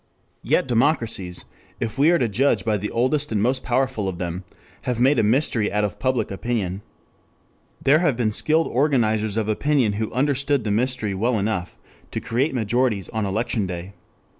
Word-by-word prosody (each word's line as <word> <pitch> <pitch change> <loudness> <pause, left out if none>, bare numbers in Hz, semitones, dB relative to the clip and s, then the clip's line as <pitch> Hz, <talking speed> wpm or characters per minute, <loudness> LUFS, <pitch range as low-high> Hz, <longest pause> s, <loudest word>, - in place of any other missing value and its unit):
Yet - - +1
democracies, 115 - 0 0.3
if 115 +3 -4
we 150 +3 +5
are 175 - +5
to 125 - +1
judge 125 +6 +1
by 110 -2 +1
the 105 +2 -4
oldest 140 +4 0
and 110 - +1
most 130 +5 +1
powerful 125 -5 0
of 90 - -6
them, 90 +1 -4 0.4
have 125 -2 -1
made 135 +4 +4
a - - +3
mystery 115 -1 +1
out 105 0 +1
of 100 -3 -3
public 130 -5 0
opinion. 100 -3 -2 1.0
There 145 +3 +4
have 150 -9 +1
been 115 -3 +1
skilled 160 +8 +2
organizers 110 -6 +1
of 110 -2 0
opinion 125 0 +1
who 110 - -2
understood 140 0 +1
the 105 - -1
mystery 115 -1 0
well 115 +5 0
enough 100 -4 -2 0.3
to - - -3
create 130 +5 -1
majorities 115 -3 0
on 110 -3 -2
election 105 0 -1
day. 90 +2 -6
115 Hz, 175 wpm, -23 LUFS, 105-130 Hz, 1.0 s, we